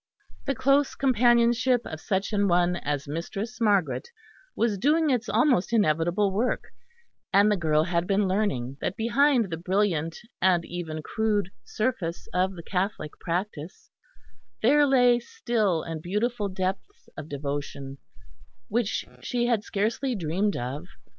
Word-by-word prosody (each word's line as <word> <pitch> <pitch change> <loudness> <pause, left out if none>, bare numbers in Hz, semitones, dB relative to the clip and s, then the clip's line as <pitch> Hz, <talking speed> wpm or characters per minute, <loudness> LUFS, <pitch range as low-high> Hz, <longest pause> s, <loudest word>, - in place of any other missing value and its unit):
The 275 - 0
close 275 +2 +2
companionship 240 -1 +3
of 160 0 -7
such 195 +2 -1
an 205 -1 +2
one 175 0 +2
as 145 -3 -3
Mistress 195 - -5
Margaret 205 - +1 0.5
was 220 -4 0
doing 300 - +3
its 245 -2 0
almost 230 -3 +2
inevitable 185 -1 +2
work; 225 +6 -1 0.6
and 205 +1 +5
the - - +3
girl 155 -4 +2
had 170 0 -1
been 200 0 +2
learning 140 - -1
that 190 - -2
behind 235 -2 +2
the 165 - -2
brilliant 175 -3 0 0.2
and 180 -3 +3
even 160 -3 -5
crude 210 -2 0
surface 200 -8 -3
of 185 +1 +1
the 170 - -9
Catholic 185 -4 -2
practice, 175 -2 -4 0.7
there 290 +5 +5
lay 245 -3 +5
still 230 - -1
and 165 -1 -5
beautiful 210 +4 -1
depths 190 - -4
of 155 - -8
devotion 140 -1 -5 0.7
which 230 -1 -1 0.2
she 240 -1 -1
had 235 -4 +1
scarcely 225 +6 -1
dreamed 190 +3 -1
of. 135 +8 -5
200 Hz, 135 wpm, -26 LUFS, 170-235 Hz, 0.7 s, and